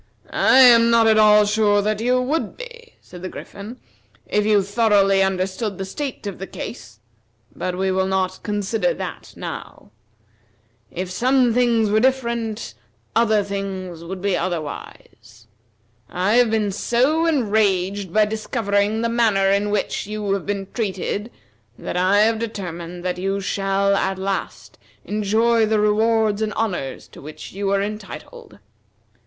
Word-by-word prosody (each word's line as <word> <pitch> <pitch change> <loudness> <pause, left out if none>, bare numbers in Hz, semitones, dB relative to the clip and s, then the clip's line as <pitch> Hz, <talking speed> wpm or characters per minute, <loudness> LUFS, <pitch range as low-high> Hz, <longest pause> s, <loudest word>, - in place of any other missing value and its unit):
"I 260 - +4
am 235 -2 +7
not 230 -1 +4
at 220 -1 +4
all 210 -1 +6
sure 205 -1 +2
that 215 +1 -1
you 250 +2 +2
would 285 +6 -2
be," 475 -1 -11
said 180 - -13
the 185 - -5
Griffin, 215 +5 -9 0.5
"if 210 0 0
you 210 -2 +4
thoroughly 200 -2 +3
understood 190 +2 -1
the 195 - -4
state 270 +4 -5
of 200 -4 -5
the 195 - -6
case, 120 - -8 0.6
but 180 0 -3
we 190 0 0
will 190 0 +1
not 190 -1 -1
consider 205 -2 -1
that - - -7
now. - - -8 1.0
If 180 +1 -5
some 250 +3 +2
things 230 -3 +2
were 215 - +4
different, 235 -3 -1 0.4
other 220 -2 +3
things 190 -4 -5
would 185 +2 -7
be 200 -2 +1
otherwise. 160 -8 -6 0.6
I 185 +4 0
have 245 -2 +4
been 215 -2 0
so 265 - +1
enraged 200 - +1
by 215 +3 +4
discovering 215 -1 -1
the - - +2
manner 220 -5 +2
in 200 +1 +1
which 205 -1 -2
you 210 -1 -2
have 195 -2 -3
been 200 -1 -2
treated 205 0 -3 0.5
that - - -6
I 185 +3 +3
have 220 +1 +2
determined 180 -5 -6
that 180 0 -2
you 195 +1 -1
shall 195 0 0
at 195 -1 -1
last 195 +1 -4 0.3
enjoy 220 +2 +2
the 215 0 +1
rewards 215 0 +2
and 215 -1 -1
honors 180 -13 -3
to - - -14
which 150 +2 -10
you 200 +1 -2
are 200 0 +1
entitled. 200 - -8
205 Hz, 150 wpm, -21 LUFS, 190-225 Hz, 1.0 s, am